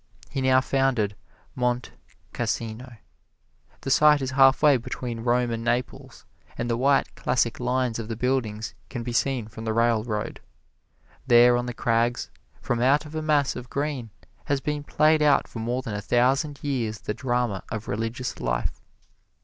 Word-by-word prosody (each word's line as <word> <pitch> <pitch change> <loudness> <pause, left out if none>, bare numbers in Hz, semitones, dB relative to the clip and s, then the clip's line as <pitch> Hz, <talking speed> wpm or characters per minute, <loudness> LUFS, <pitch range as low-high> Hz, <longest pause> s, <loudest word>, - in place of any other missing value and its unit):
He 135 - -2
now 130 0 +4
founded 130 -7 +1 0.4
Monte 125 -1 -1 0.4
Cassino. 115 +2 -4 0.8
The 135 - -3
site 150 +1 +6
is 130 -1 -3
halfway 135 +1 +5
between 120 0 -5
Rome 120 +1 +1
and 115 0 -3
Naples, 120 0 -3 0.3
and 120 - -2
the 115 - 0
white, 135 +3 +2
classic 120 -2 0
lines 125 -1 0
of 110 - -5
the 115 - -4
buildings 115 -3 -1 0.2
can 120 -3 -5
be 120 0 -4
seen 125 -2 0
from 110 +1 -9
the 110 -1 -1
railroad. 115 -2 0 0.9
There 120 0 +7
on 120 0 -1
the 120 - -5
crags, 120 +1 0 0.3
from 120 -1 -1
out 140 +4 +3
of 150 - -11
a 155 - -2
mass 150 -3 +1
of 125 -1 -8
green, 140 -5 -3 0.4
has 140 -1 0
been 150 +1 -3
played 155 +1 +3
out 145 -2 +4
for 115 - -8
more 120 +3 -2
than 115 - -5
a 105 - -3
thousand 135 +6 +1
years 120 -7 -2
the 105 - -3
drama 120 -5 -1
of 110 0 -5
religious 115 +4 -3
life. - - -2
125 Hz, 165 wpm, -25 LUFS, 115-135 Hz, 0.9 s, There